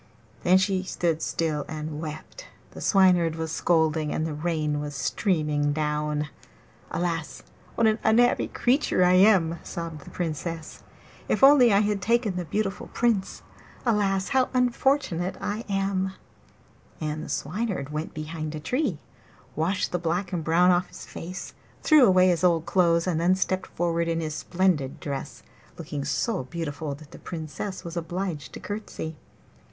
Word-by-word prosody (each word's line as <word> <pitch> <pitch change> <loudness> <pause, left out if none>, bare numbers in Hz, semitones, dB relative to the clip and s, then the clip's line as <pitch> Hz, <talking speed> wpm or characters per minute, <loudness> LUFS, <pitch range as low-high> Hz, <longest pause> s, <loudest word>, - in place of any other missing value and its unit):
Then 185 +1 +5
she 190 0 +1
stood 170 -3 -1
still 155 -3 -1
and 155 -1 -5
wept; 155 - -8 0.2
the - - -10
Swineherd 180 -5 +4
was 160 -1 -4
scolding, 160 -2 +1
and 155 - -1
the 160 - -3
rain 150 -1 -1
was 145 -1 -5
streaming 150 - 0
down. 150 0 -1 0.6
'Alas, 165 -2 -3 0.3
what 230 - +2
an 220 0 +3
unhappy 240 +3 +4
creature 250 -7 +2
I 180 0 +5
am!' 185 -4 +5
sobbed 165 -4 -6
the - - -11
Princess. 165 -1 -4 0.5
'If - - +1
only 270 -4 +8
I 200 0 +5
had 205 -2 0
taken 230 -1 +1
the 180 -1 -3
beautiful 195 +4 -2
Prince! 230 -5 0 0.4
Alas, 200 -4 +1
how 260 -1 +2
unfortunate 250 - +1
I 215 +3 -3
am!' 195 -1 0 0.9
And 155 -1 -3
the - - -8
Swineherd 180 0 -2
went 155 +2 -4
behind 155 0 -5
a - - -4
tree, 225 - -1 0.6
washed 180 +5 0
the 180 - -1
black 175 +3 -2
and 170 -3 -1
brown 175 +3 +4
off 180 0 +2
his - - -11
face, 180 +3 -7 0.3
threw 305 -5 +7
away 185 -1 +5
his 175 -2 +1
old 170 -3 +3
clothes, 170 -1 +3
and 170 -3 0
then 180 +2 +4
stepped 190 0 -1
forward 170 -1 -1
in 165 0 0
his 155 -2 -3
splendid 160 -3 0
dress, 140 -2 -6 0.3
looking 145 -2 -5
so 150 - -1
beautiful 150 -1 -4
that 150 0 -15
the - - -11
Princess 170 +4 -6
was 170 0 -7
obliged 170 -5 -4
to - - -7
courtesy. 205 -6 -6
170 Hz, 155 wpm, -26 LUFS, 155-195 Hz, 0.9 s, only